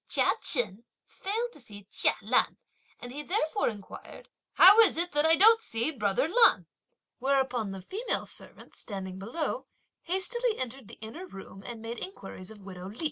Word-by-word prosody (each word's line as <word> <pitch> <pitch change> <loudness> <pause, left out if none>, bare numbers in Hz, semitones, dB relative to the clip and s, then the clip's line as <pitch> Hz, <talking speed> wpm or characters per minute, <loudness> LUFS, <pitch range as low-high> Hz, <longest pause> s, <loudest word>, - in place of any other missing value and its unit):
Chia - - +3
Chen 225 - +2 0.2
failed 455 +5 -3
to - - -12
see 205 -5 -9
Chia - - +1
Lan, - - +1 0.4
and 245 - -9
he 290 +3 -4
therefore 355 +3 0
inquired: 215 - -11 0.2
"How 405 +4 +8
is 435 -8 +6
it 345 -1 -1
I 320 +2 +5
don't 445 +5 +6
see 230 - -1
brother 210 -1 0
Lan," 460 +7 +4 0.5
whereupon 260 -4 0
the 195 -1 -8
female 430 - -2
servants, - - -13
standing 190 -3 -7
below, 305 - -4 0.3
hastily 435 +7 0
entered 260 -2 -5
the - - -11
inner 260 +13 -8
room 195 - -11
and 230 -1 -8
made 230 +1 -6
inquiries 195 - -9
of 215 -2 -13
widow 185 -1 -9
Li. 215 - -12
260 Hz, 165 wpm, -28 LUFS, -, 0.5 s, How